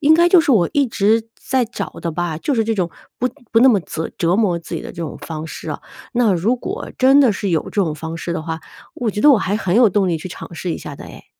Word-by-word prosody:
应 305 +2 +5
该 340 +2 +5
就 355 -1 +7
是 315 - 0
我 195 -9 +4
一 285 - +3
直 225 0 +1
在 260 -1 +1
找 215 -3 -5
的 170 - -2
吧， 170 -1 -2
就 285 - -1
是 225 -2 +1
这 225 0 0
种 180 -4 -1 0.3
不 250 - +1 0.2
不 225 - +5
那 265 - +7
么 220 - +5
折 160 -1 -5
折 170 +1 +2
磨 195 -5 +2
自 170 0 -8
己 - - -3
的 - - -8
这 - - -15
种 165 -2 -5
方 160 -1 -6
式 - - -7
啊， - - -5 0.3
那 240 -4 +3
如 200 +8 +1
果 - - -6
真 270 +2 +6
的 260 -5 +5
是 200 -1 -2
有 160 -3 +1
这 - - -8
种 160 -4 -1
方 160 +2 -6
式 170 +1 -4
的 165 - -3
话， 160 0 -4 0.4
我 235 -3 -1
觉 210 - -4
得 295 - +7
我 260 - +6
还 200 +1 -1
很 190 -2 0
有 240 -1 +6
动 195 0 +2
力 170 - +1
去 185 - -7
尝 175 - -9
试 170 +2 -3
一 - - -4
下 145 - -8
的 - - -10
哎。 - - -12
200 Hz, 310 characters per minute, -19 LUFS, 170-240 Hz, 0.4 s, 就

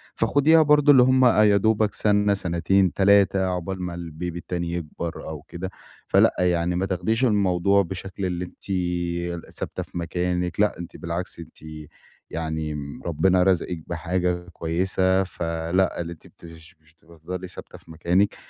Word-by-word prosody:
فخديها 155 +3 +4
برضه 150 -1 +5
اللي 130 -3 +7
هُم 130 0 +4
يا 105 -4 +5
دوبك 110 0 +2
سنة، 105 -1 +2
سنتين، 90 0 +1
3، 100 -1 +4
عقبال 90 +1 -3
ما 90 -1 -4
الBaby 85 0 -6
التاني 85 0 -4
يكبر 85 0 -5
أو 80 -2 -7
كده، 85 +4 -7 0.4
فلأ - - +4
يعني 90 -1 +1
ما 90 +2 0
تاخديش 110 +6 0
الموضوع 100 -3 +3
بشكل 95 +1 -5
اللي 90 0 -2
أنتِ - - -12 0.9
ثابتة - - -5
في - - -10
مكانِك، 90 +1 -2
لأ 105 -3 +2
أنتِ 85 -1 -8
بالعكس 85 +1 -5
أنتِ 85 - -11 0.7
يعني 80 -1 -3 0.3
ربنا 90 +3 +2
رزقِك 90 -3 0
بحاجة 90 +1 -2
كويسة، 95 +3 0
فلأ، 85 +1 -1
اللي 85 0 -5
أنتِ 80 - -17
بتش 85 +2 -15
مش 80 +1 -27
بتفضلي 85 +3 -8
ثابتة 90 - -10
في 85 - -17
مكانِك، 90 +5 +1
90 Hz, 145 wpm, -24 LUFS, 85-95 Hz, 0.9 s, اللي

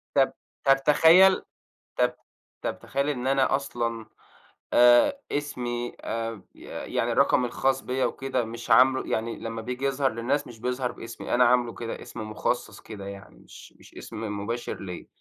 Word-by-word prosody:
طَب - - +4 0.3
طَب 135 0 +4
تخيَّل، 175 +5 +6 0.5
طَب - - +2 0.5
طَب - - -3
تخيَّل 140 +1 -2
إن 130 -3 -2
أنا 135 0 +3
أصلًا 115 -4 -3 0.7
آآ، 120 - +6
اسمي 120 -4 -3
آآ، 115 -2 -4
ي - - -17 0.3
يعني - - +1
الرقم 125 - +3
الخاص 135 +2 0
بيَّا 130 +1 -1
وكده 130 -3 -2
مش 115 +1 -8
عاملُه 130 +3 +5
يعني 115 +1 -2
لمّا 115 0 -5
بييجي 125 +4 -4
يظهر 135 0 +1
للناس 120 +6 -1
مش 115 -2 -12
بيظهر 125 +1 -2
باسمي، 115 - -7
أنا 125 +1 +5
عاملُه 120 -2 +3
كده 115 +4 -6
اسم - - -8
مُخصّص 110 -1 -2
كده 100 -3 -9
يعني 100 -11 -10
مش - - -14
مش - - -18
اسم 105 -2 -6
مباشر 115 +3 -4
ليَّا، 90 -2 -7
120 Hz, 160 wpm, -26 LUFS, 115-135 Hz, 0.7 s, تخيَّل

